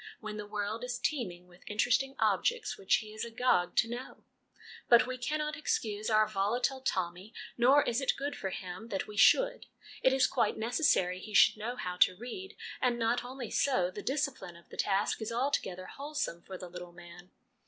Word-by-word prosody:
when 215 -1 -6
the 210 -1 -6
world 210 +2 -3
is 250 0 -3
teeming 200 - -2
with 175 0 -19
interesting 255 +6 +1
objects 475 -3 +1
which 190 - +2
he 215 -1 -4
is 215 - -4
agog 230 -6 +1
to - - +4
know. 240 +2 -7 0.7
But 235 0 +7
we 255 0 -4
cannot 300 +4 -2
excuse 215 -9 -2
our 215 -1 +4
volatile 230 +6 0
Tommy, 185 -1 -3 0.2
nor 265 +5 +5
is 240 +3 0
it 270 - +2
good 285 +1 -3
for 190 - -4
him 185 +4 -7
that 195 -4 -2
we 210 - -10
should. - - +4 0.3
It 260 - +5
is 265 0 +4
quite 230 -5 +1
necessary 220 - +2
he 210 +2 -8
should - - +7
know 230 +4 -4
how 180 -6 -4
to 180 0 +4
read; 250 - -7 0.3
and 245 -2 +2
not 230 +1 +1
only 250 -2 -7
so 185 -10 +2
the - - -7
discipline 265 - -2
of 170 - -18
the - - -10
task 200 +3 0
is 220 - -3
altogether 230 -7 -1
wholesome 280 - -4
for 190 +1 -8
the 180 - -8
little 175 0 -9
man. 175 +1 -13
225 Hz, 190 wpm, -31 LUFS, 190-260 Hz, 0.7 s, But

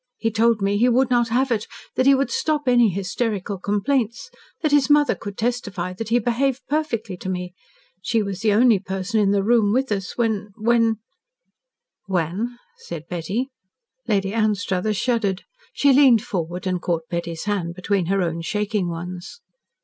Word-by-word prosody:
He 225 - -1
told 225 -1 +2
me 200 +1 +1
he 245 +2 +4
would 255 +1 +2
not 240 -1 +3
have 250 +3 +1
it 220 -2 0 0.3
that 255 - +1
he 275 - +7
would 275 +1 0
stop 300 -3 -1
any 240 -3 +5
hysterical 195 +1 -2
complaints 215 +4 -1 0.3
that 310 - +2
his 290 -1 +4
mother 295 0 +5
could 205 -2 -8
testify 200 -7 -2
that 220 +4 -6
he 235 - +4
behaved 245 +3 0
perfectly 235 -10 -2
to 185 - -6
me. 180 -1 -4 0.5
She 220 +3 +1
was 200 -2 -4
the 215 0 +2
only 225 0 +5
person 195 +3 -2
in 205 -2 +3
the 200 -1 +2
room 220 -1 +3
with 260 +1 0
us 195 -2 -3
when 215 -3 -1
when 230 0 +2 0.5
" - - -59
"When?" 190 +9 -1 0.2
said 165 -3 -7
Betty. 190 - -2 0.6
Lady 195 -1 0
Anstruthers 210 -2 0
shuddered. 210 -6 0 0.3
She 280 -1 +3
leaned 260 -5 +6
forward 175 0 -4
and 180 -2 -1
caught 165 -2 -2
Betty's 170 -1 -4
hand 190 -5 -2
between 185 -1 -1
her 195 0 +1
own 165 -1 -2
shaking 210 +1 -1
ones. 175 - -7
210 Hz, 170 wpm, -22 LUFS, 185-240 Hz, 0.6 s, he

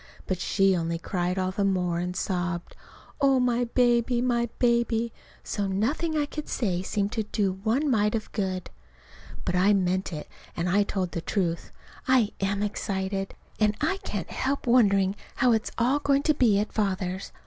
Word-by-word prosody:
But 185 -2 -2
she 195 0 +3
only 165 -1 -1
cried 180 +1 -2
all 185 0 0
the 200 +2 -1
more, 180 -3 +1
and 180 +1 -3
sobbed, 175 -2 -2 0.5
"Oh, 270 -2 +4
my 245 -1 +2
baby, 240 0 +2
my 240 -1 +1
baby!" 235 -1 +1 0.3
so 205 -2 -2
nothing 285 - 0
I 295 - +2
could 300 +1 -7
say 185 -7 0
seemed 200 +1 -1
to 225 - -1
do 200 -3 -1
one 250 +7 +1
mite 210 -4 +2
of 220 - -4
good. 185 -3 -3 0.7
But 180 - 0
I 190 +3 +4
meant 185 -1 0
it, 150 -2 -6 0.3
and 170 +1 0
I 195 +3 +3
told 190 -3 -1
the 170 - -3
truth. 170 -3 -2 0.4
I 255 -5 +4
am 200 +1 0
excited. 195 -1 -3 0.2
And 210 -1 +3
I 325 +6 +1
can't - - -5
help 275 +2 -1
wondering 200 -6 +4 0.2
how 250 - +3
it's 220 -1 +1
all 255 +5 +2
going 280 0 +2
to 305 - +3
be 235 -8 +3
at 210 - -2
Father's. 190 -3 -2
205 Hz, 175 wpm, -27 LUFS, 185-240 Hz, 0.7 s, Oh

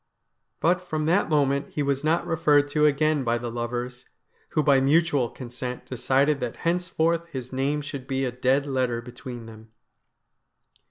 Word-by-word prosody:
But 180 +2 +3
from 155 -4 -3
that 175 +4 +2
moment 140 -2 +1
he 150 - -1
was 140 0 -1
not 160 +2 +1
referred 145 -3 +3
to 150 +1 +3
again 150 0 +2
by 120 -1 +1
the 120 0 -5
lovers, 120 +1 -4 0.4
who 155 - +1
by 140 -3 +4
mutual 145 -3 +3
consent 125 0 -7
decided 135 +3 +1
that 120 -3 -3
henceforth 170 -1 0
his 130 -4 -7
name 140 +3 0
should 140 -2 -7
be 135 0 -1
a 125 - -2
dead 130 +3 +1
letter 130 -4 0
between 125 -1 -9
them. 110 0 -13
140 Hz, 160 wpm, -25 LUFS, 125-155 Hz, 0.4 s, by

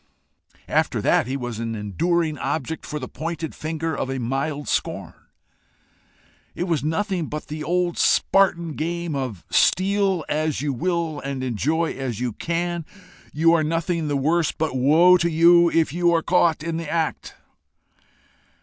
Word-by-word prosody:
After - - +1
that - - +2
he 135 +2 -2
was 120 -4 -5
an 115 -1 -3
enduring 155 - 0
object 160 +1 -3
for 150 - -4
the 130 -4 -5
pointed 165 +2 -5
finger 160 +1 -3
of 130 - -3
a 135 - -2
mild 135 +4 -2
scorn. - - -2 1.4
It - - -2
was 165 -7 -1
nothing 175 +1 -1
but 150 0 -6
the 155 0 -5
old 175 +2 0
Spartan 170 -4 +3
game 170 +2 -3
of 125 -10 -4
steal 195 -2 +2
as 155 -1 -1
you 145 0 -1
will 165 +2 -1
and 135 -2 -4
enjoy 150 +7 0
as 130 -5 -4
you 125 -2 -2
can: 170 +3 -2 0.5
you 165 +3 +3
are 165 -2 +3
nothing 165 +1 -1
the 145 -1 0
worse; 160 +3 +1
but 155 -4 -3
woe 160 +8 +5
to 170 -1 +1
you 170 +1 +5
if 165 -4 +1
you 175 0 +2
are 165 - +1
caught 170 -3 +2
in 165 0 -2
the 165 -2 -5
act! 160 -2 -2
160 Hz, 160 wpm, -23 LUFS, 140-170 Hz, 1.4 s, woe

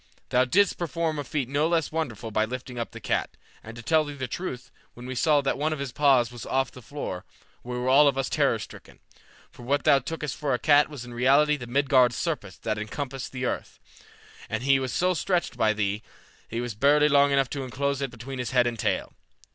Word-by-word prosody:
Thou 125 0 +3
didst 200 +10 +2
perform 165 -2 -2
a - - -2
feat 140 -2 -2
no 145 +4 +1
less 165 -2 0
wonderful 120 -9 -3
by 110 +1 +2
lifting 125 +2 -5
up 115 - -3
the - - -10
cat, - - -2 0.3
and 110 +1 -10
to 115 - -9
tell 160 +5 +3
thee 145 -1 -7
the 130 -2 -4
truth, 135 -3 -6 0.2
when 120 - -10
we 130 - -4
saw 145 +3 +3
that 135 0 -1
one 155 +2 0
of - - -4
his 140 -2 -4
paws 130 -4 +3
was 120 -2 -9
off 135 0 0
the 125 - -12
floor, 130 -9 -6 0.4
we 125 0 -5
were 125 +1 -2
all 140 +3 +6
of 135 -1 +2
us 135 - 0
terror - - +2
stricken, - - -11 0.5
for - - -15
what 140 +4 0
thou 140 - +5
tookest 150 +1 -5
for 140 -4 0
a - - -1
cat 145 +2 +4
was 140 -5 -8
in 120 - -10
reality 140 +5 +4
the 125 -4 -8
Midgard 130 -1 +3
serpent 125 - -4
that 110 -1 -1
encompasseth 135 +4 -5
the 130 -1 -4
earth, - - -4 0.7
and 110 +2 -2
he 135 0 +4
was 130 -1 -3
so 180 +6 +1
stretched 180 +1 -1
by 110 - +3
thee 105 -1 -1 0.5
that - - -7
he 115 - 0
was 120 -2 -4
barely 145 +7 +4
long 140 -1 +5
enough 135 -2 +1
to 140 -2 -3
enclose 140 +2 -2
it 135 - -1
between 125 +2 -8
his 125 - -2
head 125 -2 +3
and 120 -2 -2
tail. - - -1
135 Hz, 235 wpm, -26 LUFS, 120-145 Hz, 0.7 s, all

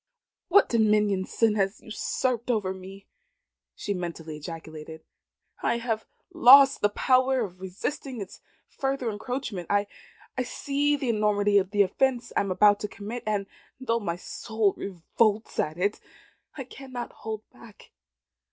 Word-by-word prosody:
"What 405 - +5
dominion 210 -4 +2
sin 225 +1 +2
has 195 +1 0
usurped 240 +2 -2
over 205 -6 0
me!" 190 +1 -11 0.7
she 205 - -3
mentally 170 -4 -5
ejaculated. 160 0 -9 0.6
"I - - +1
have 230 -2 -3 0.3
lost 275 -3 +8
the 205 - +4
power 255 +4 +2
of 185 -4 -5
resisting 250 +7 -4
its 195 -2 -8 0.3
further 270 -4 -2
encroachment. 215 -4 -4
I 205 0 +2 0.6
see 285 +3 0
the 270 -3 -2
enormity 205 -2 +3
of 190 -1 -2
the 205 0 +4
offence 240 +4 0
I - - +4
am 200 - -1
about 205 +2 +5
to 210 - -3
commit, 210 +4 -7
and 205 -2 0 0.3
though 235 -3 0
my 170 -6 -2
soul 215 +3 -1
revolts 205 +4 -1
at 155 +2 -1
it, 200 +4 0 0.6
I 270 - -4
cannot 255 -1 -8
hold 220 -1 -7
back. 220 -3 -16
210 Hz, 140 wpm, -27 LUFS, 195-245 Hz, 0.7 s, lost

